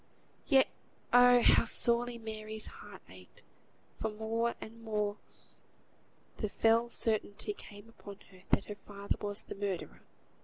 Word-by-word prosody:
Yet 270 -3 +5 0.5
oh! 245 0 +7
how - - +6
sorely 235 0 +2
Mary's 220 -1 -5
heart - - -12
ached; - - -16 0.6
for 220 - -1
more 225 +2 -1
and 230 +1 -10
more 210 -2 -1 1.2
the 215 - -2
fell 230 +3 +3
certainty 220 - -1
came 220 - -13
on 200 -1 -9
her 185 -1 -17
that - - +2
her 210 - -7
father 200 0 -3
was 205 -1 -2
the - - -7
murderer! 195 -3 -4
220 Hz, 130 wpm, -32 LUFS, 205-235 Hz, 1.2 s, oh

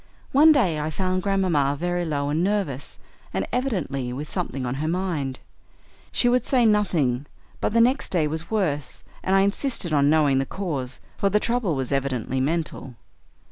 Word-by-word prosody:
One 305 +4 +7
day 195 - +2
I 150 +1 -2
found 185 +3 -1
Grandmamma 180 -8 +1
very 175 0 -1
low 145 -3 -1
and 155 +4 +1
nervous, 185 -10 -2 0.4
and 95 - 0
evidently 180 - -1
with 145 +5 -5
something 150 -7 -3
on 125 - -2
her 155 - -1
mind. 165 -7 -2 0.7
She 245 - +2
would 250 +1 +3
say 250 -3 +3
nothing, 155 - +2 0.3
but - - 0
the 230 +1 +4
next 255 +4 +2
day 170 -4 +1
was 160 +2 -4
worse, 155 -10 -2 0.2
and 190 - +1
I 195 - +5
insisted 200 - 0
on 145 -1 +4
knowing 145 -3 +4
the 135 - 0
cause, 140 -10 -4 0.2
for 200 - +2
the 210 +2 +3
trouble 230 -8 0
was 130 -1 -3
evidently 130 -2 -1
mental. 150 -3 -2
165 Hz, 175 wpm, -24 LUFS, 140-200 Hz, 0.7 s, One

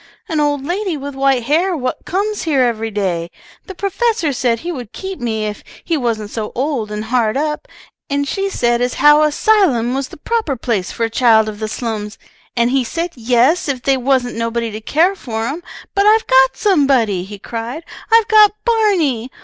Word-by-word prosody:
"An 320 -3 -1
old 290 -2 0
lady 365 0 -2
with 285 0 -6
white 270 -2 +1
hair 335 +7 +1
what 255 -2 -4
comes 410 +3 -1
here 285 -6 +2
every 225 -2 -1
day. 185 -5 -2 0.4
The 385 - -8
professor 400 - 0
said 240 -2 0
he 350 - -4
would 245 -9 -7
keep 380 -2 -6
me 220 -3 -2
if 210 -1 -5 0.2
he 335 - -1
wasn't 225 -6 -2
so 215 -2 -4
old 260 -4 -2
and 210 0 -4
hard 235 0 +1
up, 300 +1 -2 0.4
and 285 0 -1
she 390 +5 -1
said 240 -8 0
as 245 0 0
how 295 +1 +6
a 305 0 +3
'sylum 290 - +2
was 270 0 -2
the - - -13
proper 435 -4 -1
place 225 -6 -2
for 230 - -3
a 225 - +1
child 225 -2 +4
of 210 -1 -6
the 215 - -3
slums, 215 -2 -4 0.4
and 235 0 +2
he 265 -1 +2
said 335 +8 -3
yes 250 +6 +2
if 255 -3 -3
they 275 - +3
wasn't 255 -1 0
nobody 230 0 -2
to 215 +1 -7
care 325 - +2
for 225 - -4
'em. 290 +8 -4 0.3
But 400 +1 +2
I've 440 +1 +4
got 265 0 +4
somebody!" 270 - +2
he 205 +2 -9
cried. 235 - -6 0.3
"I've 455 -1 +5
got 430 -2 +6
Barney! 365 - +1
265 Hz, 200 wpm, -17 LUFS, 230-330 Hz, 0.4 s, how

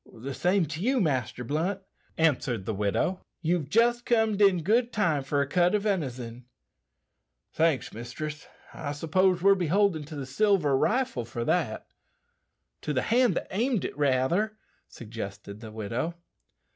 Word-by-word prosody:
"The 135 +4 -5
same 180 +4 +2
to 155 +2 -6
you, 255 +5 +2
Master 130 - -1
Blunt," 165 - -1 0.4
answered 125 -10 +1
the 110 - -2
widow; 105 - 0 0.2
"you've 165 -3 0
jist 240 +4 +3
comed 220 -4 +2
in 190 -5 +4
good 235 +6 +2
time 170 - +1
for 140 +1 0
a 140 - -1
cut 175 +5 +2
o' - - +5
venison." 130 - -3 1.1
"Thanks, 160 -4 +1
mistress; 150 +7 -6 0.3
I 145 -2 -4
s'pose 180 +4 +1
we're 200 0 +7
beholden 185 -2 +1
to 155 +1 -9
the 140 -2 -5
silver 165 -1 +2
rifle 215 - +1
for 115 0 -5
that." - - 0 1.0
"To 150 - -2
the 130 - 0
hand 240 -4 +3
that - - -3
aimed 230 +1 0
it, - - -5
rather," 150 +10 +1 0.3
suggested 105 -3 -8
the 110 -1 -9
widow. 115 +10 -3
160 Hz, 150 wpm, -27 LUFS, 130-200 Hz, 1.1 s, we're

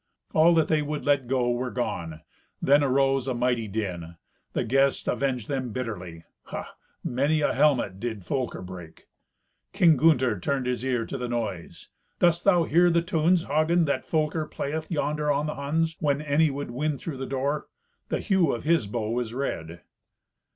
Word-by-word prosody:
All 165 +2 +5
that 160 -2 +3
they 155 -1 +2
would 150 0 -4
let 140 -3 +2
go 125 -1 +1
were 125 +1 -2
gone. 85 -11 -4 0.4
Then 145 +1 +4
arose 135 -1 +2
a 130 - -1
mighty 120 -2 0
din. 90 -5 -4 0.4
The - - 0
guests 135 +3 +1
avenged 130 -5 -1
them 130 -3 -2
bitterly. 90 -9 -5 0.2
Ha! - - -7 0.3
many 145 +5 +1
a - - +2
helmet 130 -9 +2
did 110 -4 -5
Folker 130 -5 -3
break! 90 -3 -10 0.7
King 175 -6 +5
Gunther 130 - +3
turned 135 +6 -1
his 125 -1 -2
ear 125 -3 0
to - - -5
the 125 -1 -3
noise. 105 -8 -4 0.3
"Dost 175 -1 +3
thou 180 -4 +5
hear 175 +3 +4
the 170 0 +2
tunes, 170 0 +2
Hagen, 160 +3 +2
that 140 - -1
Folker 155 0 -1
playeth 155 +3 -4
yonder 150 -2 -1
on 145 +1 0
the 150 - -2
Huns, 160 +3 -1
when 145 -2 +1
any 150 +1 +2
would 140 -2 -5
win 145 +4 -1
through 145 0 -6
the 135 0 -5
door? 140 +3 -2 0.4
The - - -1
hue 190 -8 +2
of 120 - -4
his 160 -8 +2
bow 115 +2 -2
is 120 -1 -4
red." 85 - -4
135 Hz, 175 wpm, -26 LUFS, 120-155 Hz, 0.7 s, All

